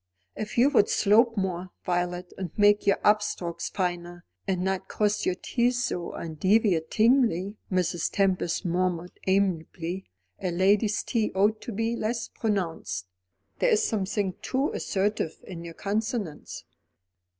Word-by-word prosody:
"If 215 +2 -5
you 260 +4 +5
would 220 -7 +4
slope 225 +3 +4
more, 185 -1 -2 0.2
Violet, 175 0 -2
and 185 -2 -4
make 205 0 +4
your 200 - +5
up 210 0 +5
strokes 175 -4 -4
finer, 175 -2 -3 0.2
and 185 -2 0
not 190 0 -1
cross 210 0 0
your 185 - +1
T's 245 +5 0
so 175 -6 -3
undeviatingly," 200 - +2
Mrs. 180 -2 0
Tempest 190 -2 +1
murmured 180 0 -1
amiably. 185 -1 0 0.4
"A 185 - -1
lady's 200 +4 +2
T 225 -4 0
ought 210 +3 +2
to - - -6
be 225 +2 -1
less 230 +1 -2
pronounced. 175 - -2 0.5
There - - +3
is 445 -1 +3
something 200 -2 -1
too 270 +3 0
assertive 195 -4 -1
in 170 -3 -8
your 165 -1 -8
consonants." 210 -5 -3
195 Hz, 135 wpm, -27 LUFS, 175-215 Hz, 0.5 s, you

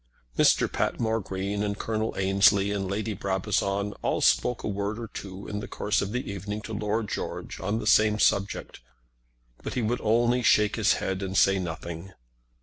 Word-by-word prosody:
Mr. - - +4
Patmore 115 -1 0
Green, 100 +1 -3
and 100 -1 -1
Colonel 110 +1 -2
Ansley, 95 +1 +4
and 100 -2 -2
Lady 105 +2 -2
Brabazon 100 +1 -1
all - - 0
spoke 125 - +2
a - - -2
word 100 +1 -2
or 115 - -5
two 100 -2 -8
in 105 - -4
the - - -6
course 105 -1 0
of 100 - -3
the 125 +2 -3
evening 105 +2 -4
to 110 - -6
Lord 105 +1 -1
George - - -5
on 100 +3 -1
the - - -4
same 105 0 +4
subject, 100 -2 0 0.8
but - - -5
he 125 - 0
would 120 +3 -1
only 120 +3 +2
shake 105 -3 +4
his - - +3
head 95 0 -2
and 95 0 -2
say 95 0 +4
nothing. 85 +1 -6
100 Hz, 180 wpm, -27 LUFS, 95-110 Hz, 0.8 s, Mr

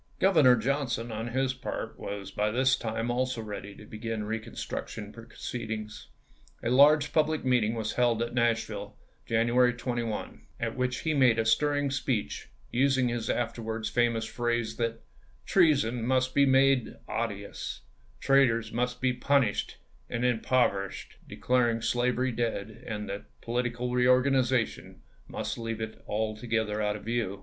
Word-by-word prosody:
Governor 155 -10 +6
Johnson, 120 -1 -1
on 110 +1 -4
his 130 +2 0
part, 130 - -6
was 100 -1 -6
by 105 +2 0
this 130 +3 +3
time 115 +1 -2
also 130 0 -1
ready 105 -2 -7
to 110 - -13
begin 110 0 -4
reconstruction 110 -1 -5
proceedings. 110 -2 -6 0.6
A 120 - 0
large 145 +3 +5
public 155 -2 +1
meeting 120 -3 +2
was 110 -1 -2
held 120 -2 +2
at 120 - -5
Nashville, 120 -2 -1 0.3
Janu 115 +1 +2
ary 125 -1 +5
21, 120 -3 -4
at 115 -1 -2
which 125 -1 -1
he 160 - 0
made 130 -5 +4
a 115 - +1
stirring 145 +4 +2
speech, 125 - -2 0.2
using 130 0 +2
i864. - - -1
his 115 -2 -3
afterwards 115 -2 -2
famous 115 -2 +1
phrase 120 -1 -2
that 115 -1 -2 0.2
" - - -32
treason 140 -10 +3
must 130 +1 +1
be 140 -1 +4
made 135 -2 +3
odious, 105 -3 -4 0.4
traitors 120 -5 +3
must 125 +1 -2
be 130 -1 +2
punished 135 -4 +1 0.3
and 115 - -2
impover 120 -4 +2
ished"; - - -10 0.2
declaring 120 -2 +1
slavery 125 +2 +1
dead, 110 -3 -3
and 105 -2 -4
that 100 +1 -5 0.2
political 120 +1 -2
pampMet. 125 - -1
reorganization 125 -1 +2 0.2
must - - -4
leave 115 -1 -4
it 110 0 -6
altogether 110 0 -1
out 105 0 0
of 105 - -9
view. 115 -4 -2
120 Hz, 150 wpm, -29 LUFS, 110-130 Hz, 0.6 s, Governor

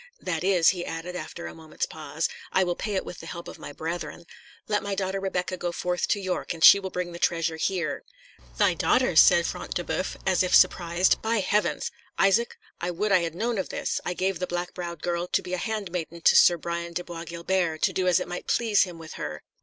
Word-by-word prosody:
"That 165 -2 -3
is," 185 -3 +5
he 180 -2 -1
added, 165 +2 -5
after 170 -1 -6
a - - -6
moment's 160 -1 -4
pause, - - -3 0.2
"I 190 - +3
will 175 -1 0
pay 210 +2 -3
it 190 - -1
with 180 - -8
the 165 - -9
help 170 0 -7
of - - -10
my - - -8
brethren. 170 +3 -5 0.4
Let 210 -1 +1
my 200 -1 -3
daughter 195 0 -2
Rebecca 185 -1 -2
go 175 -1 -2
forth 180 +1 -1
to 205 - +1
York, 185 -2 -3
and 160 - -4
she 200 - +10
will 190 -1 -5
bring 180 -1 -3
the 170 - -8
treasure 165 -2 0
here." 170 -3 -1 0.5
"Thy - - +4
daughter!" - - +2
said - - +7
Front - - -4
de - - -1
Boeuf, - - -3
as 190 -2 +3
if 185 - +3
surprised. 175 +1 +4
"By 225 +1 0
heavens! 205 +3 0 0.3
Isaac, 210 +5 +3 0.2
I 175 - -2
would 200 +4 -1
I 185 - +6
had 165 -1 -3
known 230 +2 -1
of 190 - -3
this; - - -2
I 180 - -3
gave 190 -1 -1
the 180 - -2
black 175 0 -3
browed 170 -4 -6
girl 175 0 -1
to - - +1
be 180 - -6
a - - 0
handmaiden 180 -5 -4
to - - +5
Sir 175 - +7
Brian 170 +1 -4
de 175 - -3
Bois 170 -1 -7
Guilbert, 170 -1 -1
to - - +3
do 185 -1 0
as 180 - +4
it - - -4
might 175 0 -6
please 220 -4 +3
him 175 -2 -9
with 160 -1 -10
her. 75 0 -5
180 Hz, 235 wpm, -26 LUFS, 170-190 Hz, 0.5 s, she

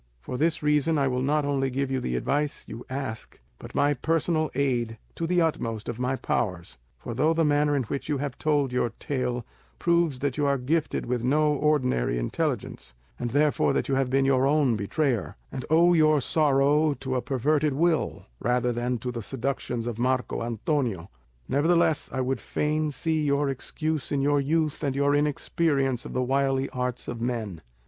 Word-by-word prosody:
For 95 - -6
this 160 +4 0
reason 150 +1 +2
I 140 -1 +2
will 125 -1 0
not 145 +2 +1
only 135 -2 0
give 135 +1 -2
you 130 - 0
the 60 - -2
advice 145 - -1
you 120 - -8
ask, 130 -4 -5 0.2
but - - -11
my 145 +1 +3
personal 160 +3 0
aid 120 -5 0 0.2
to 165 - -3
the 180 0 +2
utmost 115 -9 -2
of 120 0 -4
my 125 +1 0
powers; 90 - -2 0.2
for 115 - -6
though 155 +7 +2
the 165 -1 +2
manner 145 0 +2
in 135 - +1
which 140 +6 -5
you 145 - +1
have 140 -1 -4
told 145 -4 +1
your 125 -1 +1
tale 125 -3 -2 0.3
proves 170 -5 +2
that 135 0 -2
you 145 -1 +1
are 140 0 +2
gifted 145 +5 -1
with 120 -1 -2
no 150 +4 +3
ordinary 130 - +1
intelligence, - - -3 0.2
and 120 - -2
therefore 145 +4 +2
that - - -1
you - - +1
have 135 -1 +1
been 135 +1 +2
your 135 0 +3
own 140 -5 +3
betrayer, 120 - -1 0.2
and 130 - -5
owe 170 +3 +5
your 155 -2 +4
sorrow 145 +1 +3
to 135 -1 -4
a 125 - +1
perverted 145 +3 +1
will 165 +3 0
rather 125 +1 +1
than 120 +1 -1
to 125 +2 -4
the 120 -1 -5
seductions 125 -1 -3
of 120 -2 -4
Marco 130 0 0
Antonio, 115 - -2 0.4
nevertheless 160 +2 +2
I 130 - -1
would 130 +1 -1
fain 155 +1 -1
see 155 +2 0
your 140 0 +1
excuse 155 +3 -3
in 145 - +1
your 145 0 +3
youth 155 +1 0
and 140 -2 0
your 140 +1 +2
inexperience 145 -3 0
of - - -7
the 130 - 0
wily 135 +1 +1
arts 125 -1 -3
of 115 -1 -5
men. 110 -8 -3
135 Hz, 185 wpm, -26 LUFS, 125-150 Hz, 0.4 s, owe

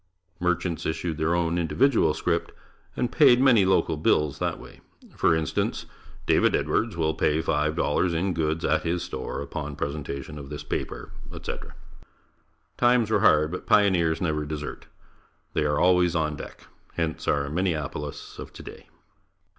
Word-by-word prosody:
Merchants 90 -1 -1
issued 80 0 -3
their 80 +2 +1
own 85 0 0
individual 85 - +2
scrip 85 +1 -1 0.5
and - - 0
payed 120 - +6
many 125 -7 +5
local 95 -4 +2
bills 75 -2 +1
that - - -2
way. - - -14 0.3
For - - +3
instance: 80 -2 -1 0.4
"David - - +3
Edwards 110 -5 0
will 80 -1 +1
pay 75 0 +1
five 75 -1 0
dollars 85 +2 +1
in 90 +3 0
goods 80 -1 -1
at - - +2
his 85 +1 -1
store 70 -2 -5
upon 75 -1 -5
presentation 75 0 -5
of 70 -1 -9
this 75 -1 -6
paper, - - -5 0.2
etc." - - -7 1.0
Times 120 -3 +3
were 105 - +3
hard, 75 -7 +4
but 90 - -6
pioneers 90 -6 +3
never 75 -4 -1
desert. 75 0 -6 0.7
They 75 - +1
are 75 0 +1
always 90 -1 +3
on 75 -2 0
deck. - - -10 0.3
Hence 80 -2 -3
our 70 -1 +1
Minneapolis 75 -3 -3
of - - -8
today. - - -11
80 Hz, 150 wpm, -26 LUFS, 75-90 Hz, 1.0 s, payed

